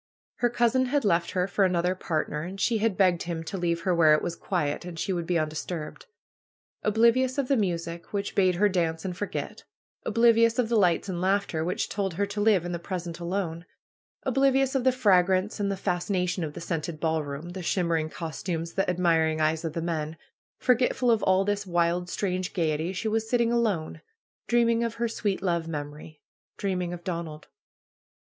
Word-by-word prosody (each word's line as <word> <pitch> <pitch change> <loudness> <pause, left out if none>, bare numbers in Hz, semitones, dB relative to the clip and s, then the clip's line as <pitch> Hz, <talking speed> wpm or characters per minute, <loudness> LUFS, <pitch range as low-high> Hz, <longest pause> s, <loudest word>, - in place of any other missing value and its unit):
Her 240 - +2
cousin 240 +2 +2
had 280 -1 0
left 170 -3 +2
her 180 -1 +1
for 200 - +1
another 180 -1 +2
part 165 -4 -2
ner 150 - -4
and 185 +4 -7
she 225 +2 +2
had 215 -3 0
begged 180 -3 +3
him 165 -1 -4
to 165 - -6
leave 170 -2 -1
her 180 +1 +1
where 160 -3 +6
it - - -2
was 170 - -2
quiet 165 -5 -2
and 175 -2 -8
she 190 +4 -1
would 170 -2 -3
be 175 - +2
undisturbed. 155 +1 -4 0.7
Oblivious 235 +5 +3
of 275 -2 0
the 275 - +3
music, 170 -5 -2
which 200 0 -2
bade 185 -2 +3
her 205 +4 +4
dance 165 -4 -1
and 180 -2 -3
forget; 205 - -5 0.4
oblivious 230 0 +4
of 245 -3 +1
the 235 - +1
lights 180 -3 +3
and 180 -3 -3
laughter, 190 -4 +1
which 180 +2 -1
told 195 -4 -2
her 200 +3 +1
to 205 +1 -4
live 205 -5 +3
in 175 - -3
the 170 - -3
present 170 -1 -5
alone; 170 -2 -3 0.6
oblivious 270 0 +2
of 265 -2 0
the 260 - +6
fragrance 190 -4 +2
and 200 -1 0
the 195 - -2
fas 180 0 -2
cination 180 -2 0
of 150 -2 -4
the - - -8
scented 165 -1 -3
ballroom, 155 -1 -2
the 185 +1 -6
shimmering 170 -3 0
cos 160 -1 -6
tumes, 165 -2 -3
the 195 - 0
admiring 165 -3 +2
eyes 155 +1 +1
of 160 -2 -3
the 165 - -3
men 160 -2 -3 0.2
— - - -78
forgetful 250 0 +3
of 225 -3 +2
all 190 +1 +3
this 205 -1 -1
wild, 175 0 +1
strange 185 0 -2
gayety, 160 -1 0
she 190 +4 -3
was 220 0 -1
sitting 235 -1 +2
alone, 215 -9 0 0.5
dream 235 -1 +3
ing 230 0 +2
of 230 -1 -2
her 235 0 0
sweet 205 -4 -2
love 170 -3 0
memory, 150 0 -7 0.4
dreaming 180 -3 -2
of 175 -1 -7
Donald. 165 -4 -5
180 Hz, 200 wpm, -27 LUFS, 170-210 Hz, 0.7 s, where